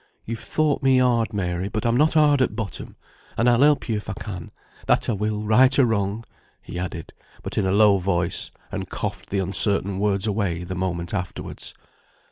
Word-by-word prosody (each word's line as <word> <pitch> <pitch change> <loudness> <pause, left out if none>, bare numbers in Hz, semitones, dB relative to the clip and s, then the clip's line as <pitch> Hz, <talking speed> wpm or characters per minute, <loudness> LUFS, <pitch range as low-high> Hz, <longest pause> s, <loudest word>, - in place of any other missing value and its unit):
You've 115 0 -5
thought 155 -2 0
me 135 -1 +4
hard, 120 -3 +2
Mary, 90 -1 -2
but 110 +3 -3
I'm 115 0 +2
not 150 +5 +3
hard 145 -3 +4
at 120 - +1
bottom, 110 -3 -6 0.4
and 115 - +2
I'll 120 0 +4
help 145 0 +4
you 110 -3 0
if 105 - -7
I - - -2
can; 90 -6 -7 0.4
that - - +3
I - - +1
will, 105 +1 -2
right 125 +5 +4
or 135 - +6
wrong," 105 -1 -1 0.4
he 90 - -7
added; 90 -2 -6 0.3
but - - -4
in 100 - +1
a - - +1
low 100 -1 +5
voice, 90 -2 -1 0.2
and - - -5
coughed - - -5
the 100 - -2
uncertain 95 0 +2
words 100 -1 +1
away 100 -5 -1
the 90 +1 -5
moment 85 -2 -3
afterwards. 90 -3 -5
105 Hz, 195 wpm, -23 LUFS, 95-120 Hz, 0.4 s, or